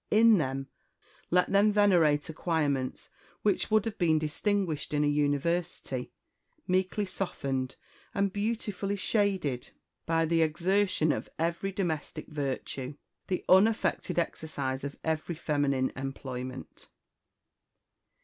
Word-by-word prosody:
In 220 -1 +6
them 135 -2 -2 0.6
let 180 +1 +3
them 200 +2 +5
venerate 175 -8 +4
acquirements 150 -5 -1 0.3
which 205 -3 +1
would 215 -1 +3
have 225 - -4
been 160 -3 +4
distinguished 155 0 -1
in 145 - +3
a - - +3
university, 145 -2 0 0.6
meekly 185 +3 +1
softened, 135 -9 -3 0.4
and 200 -1 +1
beautifully 205 -2 -2
shaded 190 - 0 0.4
by 165 0 +2
the 165 +1 +2
exertion 175 +1 +2
of - - -3
every 170 +4 -1
domestic 175 -6 -3
virtue, 140 -1 -3 0.3
the 185 - -2
unaffected 210 +2 +3
exercise 140 -6 -2
of 140 0 -4
every 160 +1 -1
feminine 145 -4 0
employment." 130 -1 -6
165 Hz, 110 wpm, -29 LUFS, 145-195 Hz, 0.6 s, In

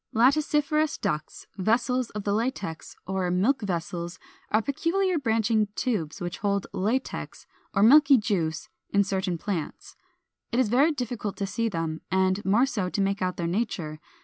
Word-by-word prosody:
] - - -47
Laticiferous 295 +4 +2
ducts, 150 0 -3
Vessels 240 +5 +1
of 210 - -3
the 200 - 0
Latex, 205 -7 -3
or 190 -1 -1
Milk 205 +10 +2
vessels 175 -2 -3 0.3
are 215 - +3
peculiar 335 - 0
branching 220 -3 +2
tubes 190 -11 -2
which 175 -2 -5
hold 200 -1 0
latex 230 +8 -2 0.3
or 195 - +4
milky 275 +3 +7
juice 175 -8 -1 0.2
in 200 0 +3
certain 190 -2 -1
plants. 170 -3 -5 0.6
It 235 - -1
is 250 -5 +3
very 275 +8 +4
difficult 245 -7 -4
to 200 - -1
see 225 +4 -1
them, 165 -4 -3
and 190 +2 +1
more 215 +7 +4
so 205 -9 -2
to 200 - -3
make 195 0 0
out 185 -1 -1
their 170 - -2
nature. 170 -5 -2
205 Hz, 160 wpm, -26 LUFS, 185-250 Hz, 0.6 s, milky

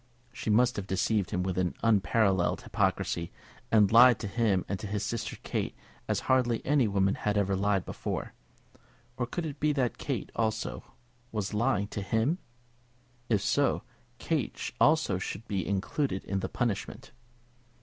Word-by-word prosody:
She 115 -2 -4
must 120 +3 +3
have 100 -1 -4
deceived 95 +1 0
him 90 - -1
with 95 -1 -1 0.2
unparalleled 100 -3 +2
hypocrisy, 85 0 -1 0.4
and 105 -3 +5
lied 120 0 +8
to 105 - -3
him 100 -3 +1
and 100 - -3
to 105 - -5
his 105 +1 -2
sister 115 - -3
Kate - - -2 0.3
as - - 0
hardly 125 -3 +1
any 140 -4 +3
woman 100 -1 +2
had 105 0 -1
ever 100 -1 +1
lied 100 -1 +1
before. - - -4 0.8
Or 125 -1 -2
could 170 +6 -3
it 145 -2 -6
be 150 0 +2
that 130 -4 -1
Kate, 130 -8 -3
also, 110 +1 -1 0.5
was 105 -2 -3
lying 110 -1 +1
to 105 - -4
him? 110 - 0 0.9
If 105 -4 +2
so, - - +2 0.3
Kate - - -2
also - - +4
should 115 - -5
be 95 -3 -2
included 100 +3 -1
in 100 0 -1
the 95 - -3
punishment. 120 -6 -3
105 Hz, 155 wpm, -29 LUFS, 100-120 Hz, 0.9 s, lied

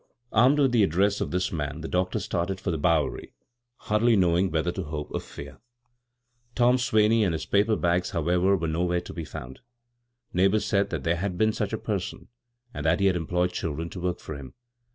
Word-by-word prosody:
Armed 125 +6 +4
with 135 -3 +3
the 120 -2 +3
address 100 +2 +2
of - - -1
diis 90 +1 -1
man 75 0 -3
the 80 - -5
doctor 90 0 0
started 90 +2 -2
for 95 -1 -2
the 80 - -2
Bowery, 80 -2 0 0.5
hardly 110 +2 +2
know 90 -4 +3
ing 95 +2 +2
whether 80 +2 0
to 95 -1 -5
hope 75 -1 -5
or - - -2
fear. 70 0 -10 1.0
Tom 125 +1 +4
Swaney 110 -2 +3
and 95 -5 +1
his 80 - -4
paper 105 +2 +2
bags, 90 -1 0
howevra', 90 +4 +2
were 80 - -2
nowhere 90 +2 0
to - - -10
be 85 -2 -5
found. 65 -2 -9 0.7
Neighbors 95 +4 +2
said 100 -1 +1
that - - -4
there 85 0 +1
had 90 0 -3
been 110 +2 +2
such - - -2
a - - -1
person, - - -4 0.4
and - - -5
that - - +3
he 100 - +2
had 95 -2 +3
employed 90 +2 0
children 80 +1 -4
to 95 - -7
work 90 0 -3
(or 75 - -4
him. 70 -2 -11
90 Hz, 210 wpm, -26 LUFS, 85-100 Hz, 1.0 s, Armed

